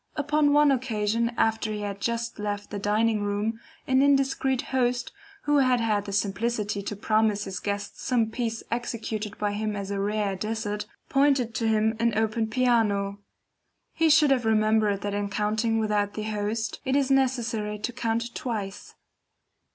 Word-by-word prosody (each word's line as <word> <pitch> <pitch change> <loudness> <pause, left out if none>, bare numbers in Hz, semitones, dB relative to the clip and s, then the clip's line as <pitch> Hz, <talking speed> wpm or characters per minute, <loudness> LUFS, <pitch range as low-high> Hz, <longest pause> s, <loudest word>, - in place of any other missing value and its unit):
Upon 295 0 +2
one 295 0 +5
occasion 230 -3 0
after 220 -1 +1
he 210 -1 -4
had 200 -1 -5
just 235 0 -2
left 205 0 -4
the 205 - -3
dining 215 +1 +1
room, 205 +2 -1 0.3
an 260 0 +3
indiscreet 270 -2 +2
host, 245 -1 +1 0.3
who 295 0 +3
had 255 -2 +3
had 210 -3 0
the 200 - -5
simplicity 205 +1 -1
to 205 +1 -5
promise 215 0 +1
his 190 -2 -5
guests 205 0 -4
some 235 -4 +1
piece 230 -1 -3
executed 225 -3 -3
by 205 -1 -1
him 210 +1 -2
as 200 -1 -4
a 200 - -2
rare 205 -1 0
dessert, 210 +1 -3 0.2
pointed 275 -4 +2
to 225 - -1
him 220 0 +2
an 230 -2 +1
open 220 0 +1
piano. 220 -5 +1 0.7
He 325 -1 +2
should 300 -2 +5
have 255 -3 +3
remembered 215 -2 +2
that 205 0 -3
in 205 0 -2
counting 215 +2 0
without 210 -2 0
the 215 - -3
host, 215 +1 -2
it 265 0 0
is 275 -1 +2
necessary 235 -5 +1
to 225 +4 -4
count 235 -1 -2
twice. 205 -6 -5
220 Hz, 165 wpm, -26 LUFS, 210-245 Hz, 0.7 s, one